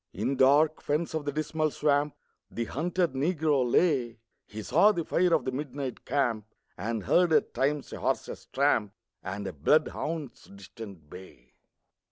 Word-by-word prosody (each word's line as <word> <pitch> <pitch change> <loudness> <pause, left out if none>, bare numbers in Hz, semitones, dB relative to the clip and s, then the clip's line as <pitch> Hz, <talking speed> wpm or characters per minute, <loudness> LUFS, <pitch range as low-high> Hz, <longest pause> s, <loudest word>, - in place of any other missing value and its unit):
In 120 +8 -1
dark 145 +4 +4
fens 155 +3 -1
of 155 -2 -3
the 145 - -1
Dismal 155 +1 -1
Swamp 145 0 +1 0.3
The 115 - -3
hunted 170 +5 -1
Negro 150 -1 +1
lay; 130 -10 +2 0.3
He 110 0 -7
saw 210 - +5
the 170 -6 -3
fire 180 0 +2
of 160 -6 +2
the 130 - -1
midnight 135 -1 -5
camp, 120 -7 0 0.3
And 110 +2 -3
heard 175 - +3
at - - +2
times 145 +1 -1
a - - -6
horse's - - -3
tramp 125 -7 +1 0.3
And 100 +2 -5
a 95 - -4
bloodhound's 150 - 0
distant 100 -4 -11
bay. 90 -7 -14
140 Hz, 155 wpm, -28 LUFS, 115-155 Hz, 0.3 s, saw